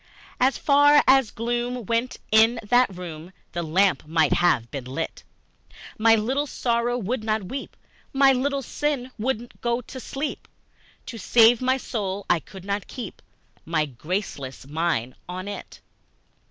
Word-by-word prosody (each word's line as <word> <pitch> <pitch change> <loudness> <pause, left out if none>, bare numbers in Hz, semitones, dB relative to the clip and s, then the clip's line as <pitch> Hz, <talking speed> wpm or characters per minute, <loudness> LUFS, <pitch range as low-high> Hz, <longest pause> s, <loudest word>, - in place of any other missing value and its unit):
As 260 +2 +3
far 290 +1 +5
as 265 -3 +5
gloom 240 +1 -3
went 230 +4 -1
in 225 +2 +5
that 245 +4 +4
room, 170 -1 -8 0.2
The 175 - -3
lamp 170 -1 +2
might 160 -2 +3
have 170 -10 +2
been 135 -3 -5
lit! 135 +6 -5 0.8
My 225 +1 +6
Little 260 +7 0
Sorrow 240 -1 0
would 235 +1 -2
not 215 -1 0
weep, 265 +9 -7 0.3
My 270 -1 +5
Little 275 +2 -1
Sin 270 -1 -2
would 240 0 -2
go 235 0 0
to 260 +2 -9
sleep 275 +4 -5 0.6
To 235 -3 -7
save 230 +2 +5
my 260 +1 +2
soul 205 -6 -4
I 175 - +3
could 190 +3 -12
not 200 -1 -2
keep 235 -7 -8 0.4
My 155 -2 0
graceless 140 - -5
mind 145 -5 -1 0.2
on 185 +2 -5
it! 205 - -8
225 Hz, 145 wpm, -24 LUFS, 175-255 Hz, 0.8 s, My